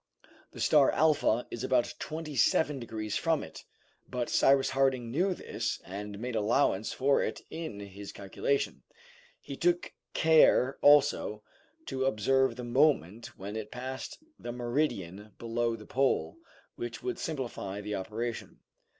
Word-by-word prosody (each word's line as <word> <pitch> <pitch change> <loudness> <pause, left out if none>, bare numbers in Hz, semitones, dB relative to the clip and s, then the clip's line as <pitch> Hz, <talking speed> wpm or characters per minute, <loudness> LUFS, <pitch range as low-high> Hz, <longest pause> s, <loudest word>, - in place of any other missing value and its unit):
The - - -11
star 145 -3 +5
Alpha 150 -7 +2
is 120 - -5
about 125 -2 +1
twenty 155 -1 -5
seven 150 0 +3
degrees 110 -3 -4
from 165 -2 +1
it, - - -11 0.4
but 125 -1 -2
Cyrus 135 0 +4
Harding 135 -3 +1
knew 180 +7 +1
this - - -3
and 100 +2 -6
made 120 +2 -4
allowance 110 -1 +1
for 135 +1 +2
it - - -3
in 160 -11 -5
his 100 0 -9
calculation. 100 +8 -2 0.6
He - - -8
took 350 0 0 0.2
care 160 -5 +5
also 140 -7 +4 0.4
to 130 0 -2
observe 130 +1 +2
the 125 - -6
moment 120 - +1
when 100 +3 -6
it 110 -1 -5
passed 130 +2 -6 0.2
the 120 - -5
meridian 120 - -2
below 115 0 -1
the - - -11
pole, 135 - 0 0.4
which - - -6
would 375 -1 -3
simplify 120 - -4
the 105 0 -5
operation. 110 +4 -4
125 Hz, 140 wpm, -30 LUFS, 110-140 Hz, 0.6 s, star